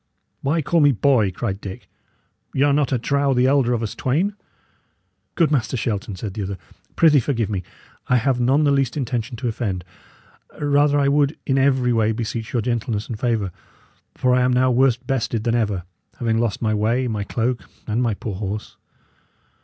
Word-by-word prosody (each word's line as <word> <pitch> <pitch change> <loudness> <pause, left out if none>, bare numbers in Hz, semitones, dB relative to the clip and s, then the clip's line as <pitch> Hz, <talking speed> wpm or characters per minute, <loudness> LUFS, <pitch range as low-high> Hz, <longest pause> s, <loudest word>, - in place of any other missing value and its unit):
"Why 155 +3 0
call 170 +5 +2
me 145 -2 +6
'boy'?" 125 -4 +3
cried 95 +2 -4
Dick. 95 -1 -8 0.7
"Y' 135 - +3
are 145 -1 +4
not, 145 -3 +1
I 130 - +2
trow, 140 +3 +1
the 125 +1 +3
elder 135 -2 +3
of 120 -2 0
us 110 - -3
twain." 165 +11 0 1.0
"Good 165 -3 +2
Master 130 -3 0
Shelton," 105 -2 -3
said 100 +1 -6
the 105 - -4
other, 100 0 -4 0.4
"prithee 155 -3 +5
forgive 115 -4 -1
me. 95 -3 -1 0.5
I 125 - +3
have 125 +1 +2
none 135 +5 +3
the 145 - +3
least 135 -1 +1
intention 120 -3 -3
to 125 - -3
offend. 105 -6 -2 0.8
Rather 145 0 +3
I 140 - +2
would 145 +1 +2
in 135 0 +2
every 130 -2 +3
way 110 -1 +2
beseech 115 0 -4
your 120 -3 0
gentleness 115 -3 -2
and 110 -3 -5
favour, 110 -6 0 0.6
for 125 -1 +2
I 125 - +3
am 125 0 +3
now 130 +1 +3
worse 125 0 +3
bested 120 -3 -2
than 115 0 +1
ever, 105 -6 0 0.3
having 115 -2 0
lost 115 -1 -1
my 110 -1 +1
way, 115 +5 +1
my 105 -3 -2
cloak, 120 +4 -2 0.2
and 110 +2 -1
my 115 -4 +1
poor 105 +1 -5
horse. 105 +1 -5
120 Hz, 190 wpm, -22 LUFS, 110-135 Hz, 1.0 s, me